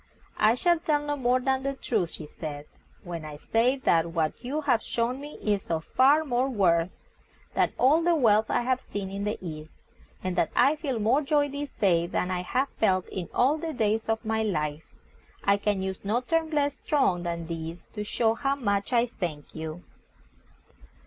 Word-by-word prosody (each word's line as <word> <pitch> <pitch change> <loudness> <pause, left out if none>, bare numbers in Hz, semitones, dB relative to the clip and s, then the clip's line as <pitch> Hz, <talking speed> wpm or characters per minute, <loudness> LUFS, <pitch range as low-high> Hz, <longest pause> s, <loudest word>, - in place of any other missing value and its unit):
"I 215 +2 +5
shall 345 +5 +2
tell 295 -3 0
no 290 0 -1
more 255 -2 +2
than 265 +1 0
the 275 0 -2
truth," 215 -9 -1
she 160 - -8
said, 150 -1 -7 0.4
"when 170 -3 -6
I 150 -1 -7
say 230 - +2
that 170 -10 +1
what 160 +5 -1
you 285 +5 -2
have 250 -6 +2
shown 240 +5 -2
me 295 +1 -9
is 205 -2 0
of 160 -1 -2
far 290 +4 +4
more 255 0 +1
worth 175 -7 +2 0.6
than - - +2
all 290 +6 +4
the 340 0 +3
wealth 220 -6 +4
I - - +2
have 255 +1 +1
seen 195 -2 -5
in 200 +1 -3
the 210 - -1
East, 155 -3 -7 0.5
and 185 -1 -2
that 165 - +2
I 275 +5 +5
feel 285 -5 -3
more 225 +7 +3
joy 290 0 +2
this 285 +1 -5
day 170 -4 +3
than 180 +1 -1
I 180 -1 -1
have 260 +9 0
felt 185 -4 +2
in 180 -3 -5
all 280 +5 +2
the 325 0 -4
days 220 -3 0
of 225 +1 -1
my 220 0 0
life. 155 -7 -2 0.5
I 200 0 +4
can 200 -1 0
use 190 -1 -4
no 215 +5 0
terms 325 +4 0
less 290 -2 +1
strong 230 -12 +2
than 170 -1 -3
these 165 +1 -6
to 210 - -4
show 225 +1 +1
how 275 +4 0
much 200 -6 -1
I 240 -1 +4
thank 170 -11 -6
you." 160 +2 -6
220 Hz, 195 wpm, -27 LUFS, 175-270 Hz, 0.6 s, I